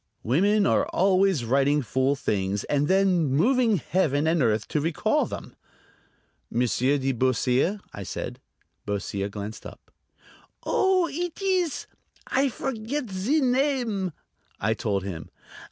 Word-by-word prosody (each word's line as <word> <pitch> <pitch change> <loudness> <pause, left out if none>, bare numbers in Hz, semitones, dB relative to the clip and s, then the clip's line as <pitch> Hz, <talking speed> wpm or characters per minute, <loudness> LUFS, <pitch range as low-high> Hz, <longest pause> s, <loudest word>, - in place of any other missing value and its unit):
Women 200 - +3
are - - +2
always 190 -7 +2
writing 140 +4 +2
fool 130 +5 +1
things, 100 -5 -1
and 145 0 0
then 190 -2 +3
moving 225 - +3
Heaven 155 -4 0
and 160 0 +2
earth 110 -3 +1
to 150 - 0
recall 160 +1 +1
them. - - -8 0.9
"Monsieur 125 +4 +1
de 135 0 0
Beausire?" 130 - +1
I 100 - -7
said. 95 - -5 0.4
Beausire 100 -1 -3
glanced 105 +1 -7
up. - - -12 0.7
"Oh, 375 -2 +2
eet 345 +2 -4
ees... 370 -5 0 0.4
I 270 +1 +1
forget 250 0 -4
zee 220 +12 +1
name?" 250 -7 +1 0.5
I 105 +2 +1
told 105 -3 -2
him. 85 -4 -6
160 Hz, 125 wpm, -25 LUFS, -, 0.9 s, Women